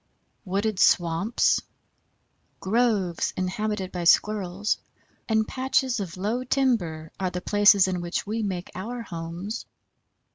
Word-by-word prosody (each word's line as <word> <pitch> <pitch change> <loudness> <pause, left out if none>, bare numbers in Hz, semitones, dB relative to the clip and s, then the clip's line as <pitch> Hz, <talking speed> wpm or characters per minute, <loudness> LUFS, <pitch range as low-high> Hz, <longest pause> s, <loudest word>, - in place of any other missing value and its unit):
Wooded 200 +1 -1
swamps, 175 +7 +3 1.0
groves 200 -5 +1
inhabited 190 +1 -2
by 175 -1 -4
Squirrels, 200 +2 +2 0.5
and 220 -1 +2
patches 260 -1 0
of 185 -2 -5
low 220 +7 -1
timber 205 - 0
are 185 -1 0
the 180 - -4
places 205 0 +5
in 180 -2 -2
which 175 0 -3
we 220 +2 -2
make 190 -4 -3
our 230 +6 -5
homes. 175 +4 -6
200 Hz, 115 wpm, -25 LUFS, 180-220 Hz, 1.0 s, places